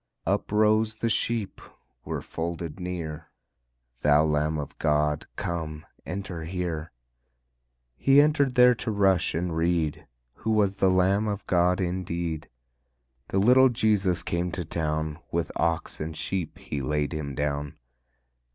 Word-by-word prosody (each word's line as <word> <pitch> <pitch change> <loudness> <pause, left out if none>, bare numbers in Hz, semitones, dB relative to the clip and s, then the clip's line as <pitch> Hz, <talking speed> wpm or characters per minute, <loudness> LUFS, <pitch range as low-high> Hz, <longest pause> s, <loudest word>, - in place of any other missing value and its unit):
Uprose 110 +1 +2
the 115 +1 -1
Sheep 115 -2 -1 0.4
were - - -4
folded 85 0 -5
near: 85 -3 -5 0.7
"Thou 75 +1 +5
Lamb 75 +1 +1
of 75 0 -6
God, 75 -1 +1
come, 80 -3 -4 0.2
enter 90 -2 -5
here." 85 -2 -3 1.1
He 135 +1 +5
entered 145 -3 +3
there 125 0 +7
to 120 - -4
rush 95 -6 +2
and 85 0 -1
reed, 80 -2 0 0.3
Who 110 +1 -1
was 100 -2 +2
the 95 - +3
Lamb 95 +3 +3
of 100 -1 -3
God 90 +1 +2
indeed. 85 -3 -3 0.8
The - - -2
little 125 +6 +6
Jesus 100 -7 +1
came 85 0 -1
to 90 -2 -3
town; 80 -1 -2
With 85 -1 -1
ox 85 -1 -1
and 80 0 -4
sheep 95 -5 -3
He 70 - -5
laid 75 +3 -1
Him 70 -3 -4
down. 70 0 -2
85 Hz, 135 wpm, -26 LUFS, 80-100 Hz, 1.1 s, there